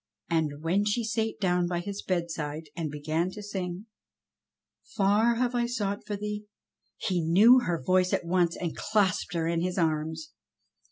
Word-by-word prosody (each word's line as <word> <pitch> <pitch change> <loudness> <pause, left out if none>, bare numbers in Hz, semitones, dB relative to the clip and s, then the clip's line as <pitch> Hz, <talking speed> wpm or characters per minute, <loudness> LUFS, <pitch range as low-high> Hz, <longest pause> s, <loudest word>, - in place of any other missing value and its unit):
And 155 -2 0
when 185 +5 +2
she 210 +3 0
sate 220 0 -1
down 180 -3 +2
by 175 0 -1
his 200 +3 -5
bedside 160 -4 -3
and 165 -3 -3
began 155 +4 -1
to 210 - -8
sing: 190 -1 -4 1.0
"Far 210 +4 +2
have 245 +1 0
I 240 -1 +1
sought 205 -4 -3
for 210 - -2
thee 210 +1 -5 0.2
— - - -64
" - - -47
he 180 -3 +1
knew 205 +11 +7
her 175 -9 -1
voice 185 +3 +3
at - - 0
once, 175 -1 +2
and 170 -3 -3
clasped 190 -5 0
her 165 -1 0
in 165 0 0
his 180 +2 -2
arms. 160 -1 -1
180 Hz, 175 wpm, -28 LUFS, 165-210 Hz, 1.0 s, knew